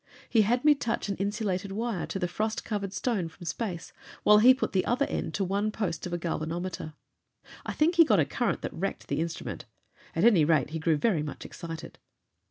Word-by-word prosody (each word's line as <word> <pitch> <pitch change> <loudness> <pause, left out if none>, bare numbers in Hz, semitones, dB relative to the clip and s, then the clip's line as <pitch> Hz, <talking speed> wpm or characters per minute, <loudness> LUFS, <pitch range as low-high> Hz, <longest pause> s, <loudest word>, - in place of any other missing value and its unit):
He 225 - +4
had 240 +6 +1
me 300 - +8
touch 235 -6 -2
an 200 - -1
insulated 200 -1 -2
wire 220 -2 -2
to - - -3
the 180 -2 -1
frost 215 +5 -2
covered 200 -3 -3
stone 195 -4 -1
from 175 - -13
space, 175 +1 -4 0.3
while 210 0 +7
he 245 +4 +8
put 260 +1 0
the 185 - +2
other 255 +4 +1
end - - -3
to 200 - 0
one 200 +3 0
post 190 -5 -3
of - - -8
a - - +1
galvanometer. 165 -1 -4 0.7
I - - -2
think 330 +3 +2
he 335 - +10
got 215 - +3
a 150 - +4
current 235 - -1
that - - -4
wrecked 195 +4 -4
the - - 0
instrument. 165 0 -4 0.5
At 165 - +1
any 210 -9 +6
rate, 150 -3 +2
he 160 - -3
grew 160 -1 +2
very 170 0 +2
much 150 -1 -6
excited. 165 -1 -8
195 Hz, 210 wpm, -28 LUFS, 165-225 Hz, 0.7 s, he